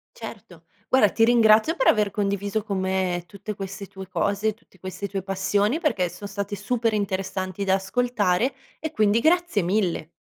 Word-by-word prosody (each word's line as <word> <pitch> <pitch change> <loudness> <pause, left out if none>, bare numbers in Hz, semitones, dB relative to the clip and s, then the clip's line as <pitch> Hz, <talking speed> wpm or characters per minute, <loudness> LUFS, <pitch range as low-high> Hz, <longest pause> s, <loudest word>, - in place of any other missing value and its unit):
Certo. - - -10 0.2
Guarda, 260 -6 +5
ti 225 - +4
ringrazio 230 +4 +5
per 265 - +1
aver 210 -2 +4
condiviso 200 +1 -1
con 200 -2 -3
me 185 -2 -1
tutte 200 +3 -7
queste 195 0 -7
tue 190 -1 -10
cose, 205 +3 0
tutte 200 -3 -26
queste 185 +2 -5
tue 195 -2 -3
passioni, 200 - 0
perché 195 - +1
son 180 +4 -8
state 200 0 -4
super 225 +2 -1
interessanti 190 -1 -2
da 190 -1 +2
ascoltare, 225 +2 0 0.3
e 315 0 -4
quindi 215 -4 +3
grazie 340 - +2
mille. 175 -4 0
200 Hz, 165 wpm, -24 LUFS, 190-220 Hz, 0.3 s, Guarda